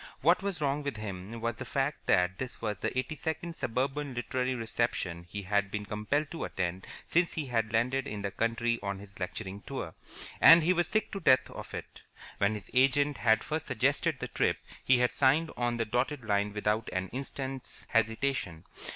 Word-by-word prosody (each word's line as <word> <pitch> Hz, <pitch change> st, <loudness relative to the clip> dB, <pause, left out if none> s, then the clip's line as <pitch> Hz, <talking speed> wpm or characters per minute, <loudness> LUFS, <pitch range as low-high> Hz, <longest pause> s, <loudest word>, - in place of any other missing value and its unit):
What 170 Hz, +8 st, +4 dB
was 195 Hz, -4 st, -2 dB
wrong 145 Hz, 0 st, +1 dB
with 140 Hz, -5 st, -3 dB
him 105 Hz, +2 st, -6 dB
was 115 Hz, -1 st, -1 dB
the -, -, -4 dB
fact 135 Hz, +3 st, -2 dB
that 90 Hz, 0 st, +3 dB
this 130 Hz, -1 st, -5 dB
was 105 Hz, -2 st, -3 dB
the -, -, -2 dB
eighty 130 Hz, +4 st, -1 dB
second 160 Hz, +2 st, -3 dB
suburban 135 Hz, +2 st, -2 dB
literary 130 Hz, +1 st, -1 dB
reception 110 Hz, -7 st, -2 dB
he 100 Hz, +2 st, -5 dB
had 100 Hz, +1 st, +1 dB
been 105 Hz, +1 st, -3 dB
compelled 110 Hz, +8 st, -1 dB
to 165 Hz, -, -4 dB
attend 90 Hz, 0 st, -3 dB, 0.2 s
since 170 Hz, +1 st, +2 dB
he 155 Hz, -, -2 dB
had 115 Hz, -4 st, 0 dB
landed 125 Hz, +4 st, +1 dB
in 105 Hz, -1 st, -5 dB
the 100 Hz, -, -2 dB
country 115 Hz, +3 st, 0 dB
on 100 Hz, -1 st, -3 dB
his 100 Hz, 0 st, -12 dB
lecturing 95 Hz, +2 st, -5 dB
tour, 115 Hz, -12 st, -5 dB, 0.5 s
and 165 Hz, 0 st, +10 dB
he 180 Hz, +3 st, +4 dB
was 175 Hz, -2 st, +1 dB
sick 215 Hz, -1 st, 0 dB
to 195 Hz, -, -3 dB
death 130 Hz, -7 st, +5 dB
of -, -, -8 dB
it. -, -, -8 dB, 0.4 s
When 100 Hz, +2 st, +2 dB
his 100 Hz, -3 st, -9 dB
agent 140 Hz, +2 st, +3 dB
had 110 Hz, -2 st, +3 dB
first 155 Hz, +1 st, -3 dB
suggested 130 Hz, -5 st, +1 dB
the -, -, -4 dB
trip, -, -, +1 dB, 0.3 s
he 130 Hz, -, +5 dB
had 125 Hz, 0 st, +2 dB
signed 150 Hz, +4 st, +3 dB
on 120 Hz, -1 st, 0 dB
the 115 Hz, -, 0 dB
dotted 125 Hz, +3 st, -1 dB
line 100 Hz, -1 st, +1 dB
without 105 Hz, +1 st, 0 dB
an 95 Hz, 0 st, -2 dB
instant's 135 Hz, 0 st, -5 dB
hesitation. 115 Hz, -6 st, 0 dB
120 Hz, 195 wpm, -30 LUFS, 105-140 Hz, 0.5 s, and